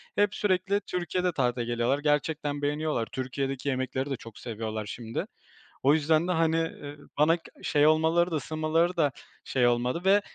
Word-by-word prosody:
Hep 205 -1 +2
sürekli 195 0 +1
Türkiye'de 180 0 -1
tatile 125 -5 0
geliyorlar 120 +3 +1
gerçekten 145 0 0
beğeniyorlar. 145 -4 -1
Türkiye'deki 135 +1 -3
yemekleri 130 +1 -2
de 135 - -1
çok 115 -3 -12
seviyorlar 110 -2 -4
şimdi 115 +2 -4 0.6
o 140 +2 +6
yüzden 155 +2 +2
de, - - +1
hani, 165 -1 +2
eee, 150 -3 -4 0.2
bana 155 +3 +4
k 165 - -26 0.2
şey 145 0 +3
olmaları 160 +3 +3
da - - 0
ısınmaları 155 +4 0
da 150 -4 +3 0.3
şey 125 -2 +2
olmadı 120 +6 +1
ve, 200 +2 +5
150 Hz, 160 wpm, -28 LUFS, 130-165 Hz, 0.6 s, o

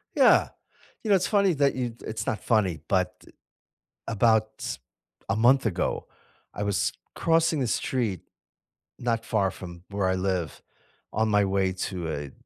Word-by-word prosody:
Yeah. - - +5 0.5
You 220 - -3
know, 200 - +6
it’s 185 -1 +1
funny 200 -3 +3
that 140 -1 +3
you 120 -3 -3
it’s 110 0 -4
not 105 - -1
funny, 105 -7 +2
but 90 -2 0 0.8
about 110 0 +3 0.8
a 100 - +2
month 120 +4 +4
ago, 90 -5 +1 0.7
I - - 0
was 100 -1 0 0.4
crossing 165 -1 +2
the 130 - 0
street 115 - -1 0.8
not 115 -2 -1
far 100 -4 +1
from 85 -2 -10
where 100 -2 +1
I 95 - +2
live 95 -3 -1 0.7
on 110 - +3
my 105 -1 +4
way 95 -1 +3 0.2
to 95 - -7 0.2
a 70 -2 -7
110 Hz, 150 wpm, -26 LUFS, 95-125 Hz, 0.8 s, know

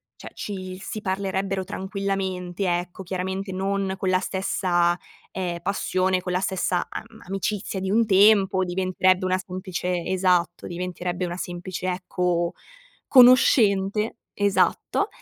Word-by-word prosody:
cioè - - -11
ci 185 -2 -6
si 215 +2 -5
parlerebbero 195 -1 -1
tranquillamente, 190 -1 -3
ecco, 180 +2 -8
chiaramente 190 +1 -3
non 195 +1 -1
con 190 - 0
la 185 0 +3
stessa, 180 -2 +1 0.3
ehm, 175 -2 -3
passione, 185 -1 0
con 180 - -4
la 180 - +1
stessa 185 -2 -1
am - - -6 0.2
amicizia 195 +1 -2
di 190 0 -2
un 225 +2 +3
tempo. 195 -1 +5
Diventerebbe 185 +1 +1
una 185 0 +2
semplice 180 -1 -3
esatto, 180 -2 +1
diventerebbe 180 0 -3
una 175 0 -4
semplice, 180 +1 -5
ecco, 180 -1 -1 0.5
conoscente. 220 -5 +5 0.2
Esatto. 200 - +1
185 Hz, 120 wpm, -24 LUFS, 180-195 Hz, 0.5 s, tempo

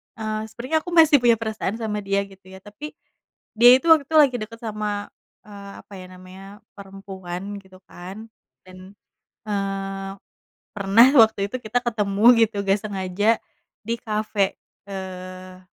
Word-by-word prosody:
eee, 215 -1 -4
sebenarnya 255 +8 -2
aku 350 +2 -9
masih 310 -4 +6
punya 240 -1 +4
perasaan 220 -2 -4
sama 215 -2 -3
dia, 200 0 -1
gitu 195 -1 -17
ya, 190 0 -13
tapi, 285 +9 -10 0.6
dia 240 +2 +8
itu 300 - -12
waktu 305 -4 +6
itu 320 - -3
lagi 275 -5 +5
deket 230 +2 -8
sama, 210 -2 -4 0.4
eee, 200 -1 -11
apa - - -38
ya 185 - -10
namanya, 185 +1 -13 0.3
perempuan, 195 0 -8
gitu 185 -1 -18
kan. 195 +5 -11 0.3
Dan, 185 +2 -14 0.5
eee, 195 -1 -4 0.7
pernah 200 +5 +5 0.2
waktu 200 -2 +1
itu 255 - -3
kita 240 +2 -1
ketemu 210 -2 -1 0.2
gitu, 210 - -13
nggak 195 +1 +2
sengaja, 195 0 -2 0.6
di 230 +2 -2
cafe. 210 -3 -1 0.3
Eee, 185 -1 -8
205 Hz, 145 wpm, -22 LUFS, 195-225 Hz, 0.7 s, dia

